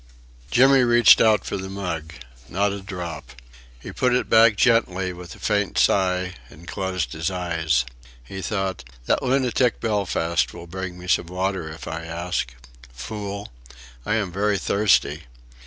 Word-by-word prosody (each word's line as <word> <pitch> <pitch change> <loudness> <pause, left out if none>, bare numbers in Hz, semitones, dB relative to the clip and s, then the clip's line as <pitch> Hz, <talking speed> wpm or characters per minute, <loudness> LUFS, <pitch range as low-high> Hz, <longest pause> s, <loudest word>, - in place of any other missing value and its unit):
Jimmy 135 - +5
reached 120 -1 +6
out 110 -3 +4
for - - -3
the 95 0 -6
mug. 85 -5 -5 0.3
Not 100 +2 +1
a 100 0 -5
drop. 90 -7 -7 0.5
He - - -8
put 125 -1 +1
it 125 - -1
back 115 -1 +6
gently 95 -6 +2
with 90 -2 -10
a - - -17
faint - - 0
sigh 90 -1 +2 0.2
and 80 +4 -15
closed 95 +1 -3
his 80 +2 -2
eyes. 80 -8 0 0.4
He 95 +9 -7
thought: 95 0 -2 0.2
That - - +1
lunatic 130 -2 +1
Belfast 90 -6 0
will 85 0 -9
bring 90 +1 -6
me 90 0 -10
some 85 -1 +2
water 90 -2 -2
if 80 +1 -9
I 80 +1 -5
ask. 85 -5 -3 0.4
Fool. 100 - -6 0.5
I 105 - 0
am 100 -5 -1
very 100 +3 +1
thirsty.... 100 -7 +1
95 Hz, 155 wpm, -23 LUFS, 85-105 Hz, 0.5 s, reached